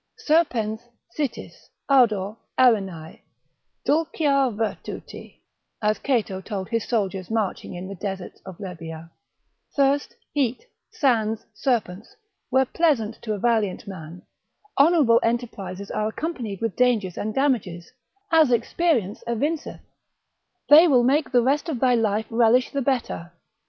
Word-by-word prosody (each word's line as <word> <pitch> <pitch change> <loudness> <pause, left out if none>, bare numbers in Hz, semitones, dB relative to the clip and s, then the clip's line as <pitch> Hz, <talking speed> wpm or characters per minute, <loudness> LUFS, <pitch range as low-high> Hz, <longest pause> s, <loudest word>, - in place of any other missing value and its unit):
—serpens, 260 - +1 0.3
sitis, 285 -6 -5 0.2
ardor, 220 -7 +3 0.2
arenae, 195 -10 +1 0.6
Dulcia 290 -3 +2
virtuti, 215 -1 -6 0.4
as 215 0 0
Cato 220 -8 -1
told 190 -1 -5
his 230 -2 -1
soldiers 195 -5 -1
marching 220 -4 -2
in 180 +1 -6
the 195 - -6
deserts 190 -1 -6
of 190 -3 -10
Libya, 165 -4 -8 0.6
Thirst, 280 0 +1 0.2
heat, 265 - -1 0.2
sands, 230 - 0
serpents, 215 -4 -2 0.3
were 265 +1 +3
pleasant 250 -8 0
to 215 - -3
a - - -3
valiant 215 -4 0
man; 175 -2 -9 0.6
honourable 280 -6 +5
enterprises 200 -5 -3
are 215 0 -1
accompanied 230 - -4
with 225 -3 -2
dangers 225 -8 +1
and 215 0 -4
damages, 220 -12 -1 0.4
as 320 -5 +5
experience 240 - 0
evinceth: 290 +7 -2 0.9
they 315 +4 +8
will 255 -6 +4
make 280 +4 +2
the 245 -2 +4
rest 285 +6 +1
of 275 -7 -2
thy 255 0 +3
life 220 -2 +1
relish 235 +2 +3
the 280 - -1
better. 240 -10 -2
230 Hz, 125 wpm, -24 LUFS, 200-270 Hz, 0.9 s, they